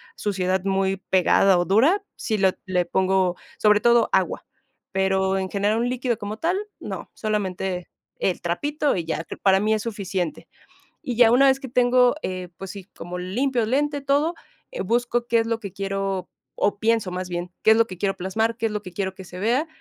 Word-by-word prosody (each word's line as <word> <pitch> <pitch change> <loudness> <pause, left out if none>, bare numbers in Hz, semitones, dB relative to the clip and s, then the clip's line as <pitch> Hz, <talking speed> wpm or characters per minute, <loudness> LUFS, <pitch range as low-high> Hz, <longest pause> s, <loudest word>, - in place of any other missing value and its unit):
suciedad 190 -2 -1
muy 195 0 +1
pegada 190 0 +3
o 175 - +1
dura, 275 - +3
sí 220 - -1
lo 190 -2 +4
le 180 -1 0
pongo, 185 0 +1 0.2
sobre 210 -1 +4
todo, 235 +1 +4
agua. - - 0 0.5
Pero 190 0 +1
en 190 0 -3
general, 205 +3 +1
un 240 +1 0
líquido 245 -2 -1
como 210 0 -5
tal, 335 +8 0 0.2
no, - - -6
solamente 190 -4 -2 0.3
el 185 - 0
trapito 290 - 0
y 170 -3 -2
ya, 165 0 -3 0.2
para 190 -1 +4
mí 215 +2 +2
es 215 - 0
suficiente. 195 -6 -3 0.5
Y 245 - -4
ya 230 -1 +6
una 270 +3 +6
vez 265 0 +3
que 265 - -7
tengo, 250 +1 +4
eh, 185 -1 -4
pues 195 -1 -7
sí, 200 -2 -9
como 180 +1 -7
limpio 240 +7 0
el 220 - -3
lente, 290 +1 +1
todo, 285 +5 +1 0.4
eh, - - -4
busco 240 0 0
qué 235 -1 +3
es 225 - 0
lo 230 0 -1
que 200 - -6
quiero, 195 -1 -3 0.4
o 205 0 +2
pienso 225 -3 +1
más 180 0 -4
bien, 175 0 -4
qué 220 - +6
es 220 - +6
lo 230 0 +4
que 185 - -8
quiero 195 +2 0
plasmar, 220 +5 -1
qué 230 -1 0
es - - -5
lo 210 -1 -4
que 185 - -9
quiero 190 0 -3
que 190 - -10
se 180 0 -10
vea. 245 - +1
205 Hz, 205 wpm, -23 LUFS, 190-235 Hz, 0.5 s, ya